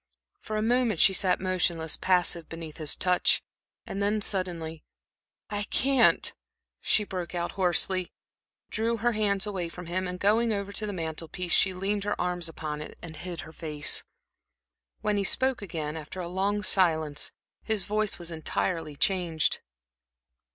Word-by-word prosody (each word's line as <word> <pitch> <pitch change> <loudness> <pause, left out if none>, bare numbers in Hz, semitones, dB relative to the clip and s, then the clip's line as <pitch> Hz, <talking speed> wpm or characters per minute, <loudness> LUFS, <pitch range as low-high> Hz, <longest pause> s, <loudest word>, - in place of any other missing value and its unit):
For 215 - -4
a 215 - 0
moment 235 -5 +2
she 195 - +6
sat 185 -1 +3
motionless, 175 -4 0
passive 175 -3 +1
beneath 165 -2 -8
his 155 -2 +1
touch, 180 -1 +2 0.4
and 200 - -4
then 205 +2 +2
suddenly: 175 -6 0 0.7
"I 205 0 0
can't," 265 +4 +3 0.5
she 215 - +3
broke 185 -3 -5
out, 170 0 -1
hoarsely, 185 0 +2 0.6
drew 230 +2 +1
her 240 +2 +2
hands 210 -2 +1
away 190 -5 -3
from 180 +1 -9
him, 185 +2 -1
and 180 0 -5
going 225 +4 +3
over 200 -1 -2
to 215 +1 -2
the - - -2
mantel 165 -3 -4
piece, 180 +2 -3
she 190 - +5
leaned 195 +2 -1
her 205 - -2
arms 175 -1 -1
upon 150 -2 -5
it 150 - -9
and 165 -2 -6
hid 175 +1 -6
her 160 +2 -11
face. 150 -2 +1 1.0
When 210 -1 +1
he 200 - +1
spoke 260 +4 +2
again, 160 -6 -4
after 160 +3 -7
a 175 - -3
long 200 +3 0
silence, 160 -7 +2 0.3
his 215 -3 0
voice 210 +1 0
was 175 -1 -5
entirely 160 -1 -2
changed. 170 -2 +1
185 Hz, 160 wpm, -28 LUFS, 165-205 Hz, 1.0 s, she